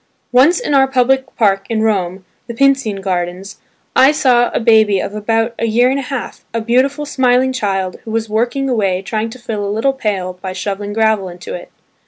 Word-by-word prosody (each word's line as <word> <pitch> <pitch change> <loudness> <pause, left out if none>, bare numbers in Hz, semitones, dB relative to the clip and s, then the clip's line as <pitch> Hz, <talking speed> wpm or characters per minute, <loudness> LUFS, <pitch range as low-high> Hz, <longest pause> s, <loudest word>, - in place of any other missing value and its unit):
Once 265 - +4
in 485 -12 -2
our 270 -1 +5
public 265 0 +1
park 195 -3 +1
in 220 -1 0
Rome, 190 -3 -1 0.2
the 235 - -6
Pincian 265 -6 +1
Gardens, 185 0 -3 0.4
I 265 +2 +6
saw 245 -5 +3
a - - -1
baby 220 -4 +4
of 200 - -4
about 225 +2 0
a 230 - 0
year 240 +3 +3
and 275 - 0
a 265 - -6
half, 270 -4 -5
a - - +1
beautiful 260 +6 +1
smiling 260 -2 +2
child, 195 -6 -2
who - - -9
was 225 0 -1
working 240 +6 -1
away 195 -7 0
trying 220 +3 -2
to 225 - -10
fill 225 -4 -4
a 200 - -2
little 225 +7 0
pail 190 -8 -3
by 190 -1 -5
shoveling 205 +2 -4
gravel 220 -3 +1
into 180 - -9
it. - - -8
225 Hz, 200 wpm, -16 LUFS, 200-255 Hz, 0.4 s, I